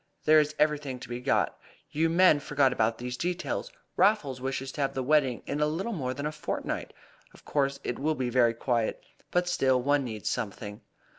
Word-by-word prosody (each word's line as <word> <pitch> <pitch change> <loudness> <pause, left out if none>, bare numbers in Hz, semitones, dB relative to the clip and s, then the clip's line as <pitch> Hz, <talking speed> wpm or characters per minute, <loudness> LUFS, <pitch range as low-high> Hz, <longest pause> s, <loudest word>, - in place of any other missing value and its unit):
There 155 0 +7
is 150 0 0
everything 150 -3 +1
to - - -8
be 120 0 -4
got. - - +1 0.3
You 160 +2 +1
men 170 -2 +5
forget 140 -2 +2
about 115 -1 +1
these 125 0 -4
details. 180 - -3 0.2
Raffles 160 -11 +2
wishes 135 0 -3
to 145 - -5
have 135 - 0
the 130 - -1
wedding 135 -3 +2
in 145 - -3
little 160 +10 0
more 130 -8 -3
than 145 - -4
a 150 - -1
fortnight. 150 -1 -4 0.4
Of - - -19
course 140 -1 0
it 120 - -3
will 155 +3 +1
be 130 -3 -2
very 120 -2 +3
quiet, 115 -2 -1 0.3
but 180 0 +1
still 130 -7 +2
one 140 +2 +2
needs 110 -4 -5
something." 105 0 -4
140 Hz, 195 wpm, -28 LUFS, 125-155 Hz, 0.4 s, There